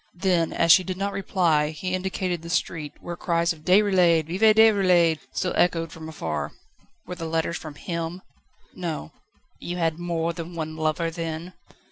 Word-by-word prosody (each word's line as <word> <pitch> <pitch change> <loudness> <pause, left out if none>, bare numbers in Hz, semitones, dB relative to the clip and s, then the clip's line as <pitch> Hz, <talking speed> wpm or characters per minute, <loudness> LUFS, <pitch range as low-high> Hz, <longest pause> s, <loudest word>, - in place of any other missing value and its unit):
Then 175 -2 +1
as 165 0 +3
she 185 - +7
did 185 0 -4
not 200 +1 -2
reply 170 -6 +1
he 180 +4 -4
indicated 185 -2 -2
the 170 - -9
street, 165 -3 -2
where 175 - -6
cries 170 0 0
of 160 - -15
"Déroulède! 180 -2 +4
Vive 210 +7 +3
Déroulède!" 185 -7 +5
still 180 - -2
echoed 165 -2 +1
from 160 -1 -9
afar. 160 - -4 0.5
"Were - - -6
the 165 -2 -5
letters 165 +1 -1
from 155 -2 -9
him?" 170 +2 -5 0.5
"No." 165 - -5 0.5
"You 175 +1 -5
had 165 -1 0
more 170 -1 -1
than 170 0 -7
one 155 -1 -4
lover, 160 +1 -1
then?" 165 +1 -5
170 Hz, 165 wpm, -25 LUFS, 160-185 Hz, 0.5 s, she